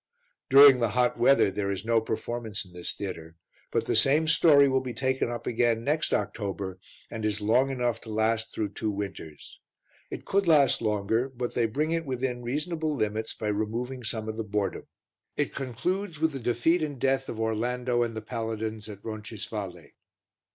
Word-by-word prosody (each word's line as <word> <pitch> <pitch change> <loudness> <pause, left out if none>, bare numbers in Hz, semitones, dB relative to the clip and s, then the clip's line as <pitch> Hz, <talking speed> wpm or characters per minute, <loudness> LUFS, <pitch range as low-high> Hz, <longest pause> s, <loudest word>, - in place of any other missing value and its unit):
During 135 -1 +9
the 115 -2 +1
hot 125 -1 +2
weather 125 -5 +5
there 100 0 -2
is 100 +2 -4
no 115 -1 +3
performance 110 -1 -4
in 90 - -17
this 90 -1 -4
theatre; 85 -5 -6 0.3
but - - 0
the - - 0
same 150 +4 +4
story 150 -3 +6
will 130 -1 +2
be 125 -3 -6
taken 130 0 0
up 120 0 -5
again 115 -1 +1
next 150 +4 0
October 95 -3 -2 0.3
and 110 -2 -5
is 105 -1 0
long 120 +6 +3
enough 120 -3 -1
to 115 - -11
last 110 +1 0
through 105 -2 -2
two 110 +2 -3
winters. 100 -6 -7 0.5
It - - -7
could 195 -1 +1
last 150 -4 +5
longer, 110 +3 0
but 125 -2 -4
they 115 -2 +2
bring 150 +8 -1
it 165 -2 -1
within 125 -1 -2
reasonable 155 +5 -2
limits 110 -2 -2
by 105 - -3
removing 115 +5 -3
some 110 -1 -3
of 110 0 -4
the 115 - -2
boredom. 105 -1 -2 0.5
It - - 0
concludes 165 - -3
with 160 0 +2
the 135 - -5
defeat 120 +9 +1
and 150 -3 -3
death 135 +1 +1
of 110 - -5
Orlando 120 +2 0
and 115 -1 -1
the 110 - -4
paladins 110 -2 -4
at 100 -1 -10
Roncisvalle. 105 -3 -6
115 Hz, 180 wpm, -27 LUFS, 110-135 Hz, 0.5 s, During